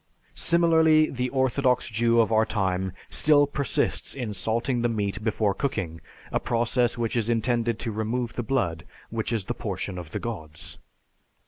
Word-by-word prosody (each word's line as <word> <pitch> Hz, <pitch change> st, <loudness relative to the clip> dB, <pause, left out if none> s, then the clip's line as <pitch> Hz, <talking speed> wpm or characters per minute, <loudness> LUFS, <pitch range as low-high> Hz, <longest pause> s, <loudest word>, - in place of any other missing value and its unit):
Similarly, 160 Hz, -2 st, +4 dB
the 125 Hz, -1 st, -2 dB
orthodox 130 Hz, -1 st, +1 dB
Jew 115 Hz, +1 st, +3 dB
of 115 Hz, -, 0 dB
our 110 Hz, 0 st, +4 dB
time 95 Hz, -4 st, -1 dB, 0.2 s
still 145 Hz, -1 st, +4 dB
persists 140 Hz, -1 st, -1 dB
in 120 Hz, -6 st, -4 dB
salting 115 Hz, +6 st, 0 dB
the 120 Hz, -, +1 dB
meat 105 Hz, -2 st, -2 dB
before 105 Hz, -2 st, +1 dB
cooking, 95 Hz, -, -3 dB, 0.3 s
a -, -, +1 dB
process 120 Hz, +1 st, +1 dB
which 115 Hz, 0 st, -1 dB
is 115 Hz, -1 st, 0 dB
intended 115 Hz, 0 st, +1 dB
to 115 Hz, -1 st, -3 dB
remove 115 Hz, +3 st, -2 dB
the -, -, -2 dB
blood, 110 Hz, -, -1 dB, 0.3 s
which 115 Hz, 0 st, -2 dB
is 110 Hz, -5 st, -1 dB
the 120 Hz, -, -2 dB
portion 100 Hz, -5 st, -4 dB
of 85 Hz, -3 st, -9 dB
the -, -, -4 dB
Gods. 80 Hz, -10 st, -5 dB
115 Hz, 160 wpm, -26 LUFS, 105-125 Hz, 0.3 s, Similarly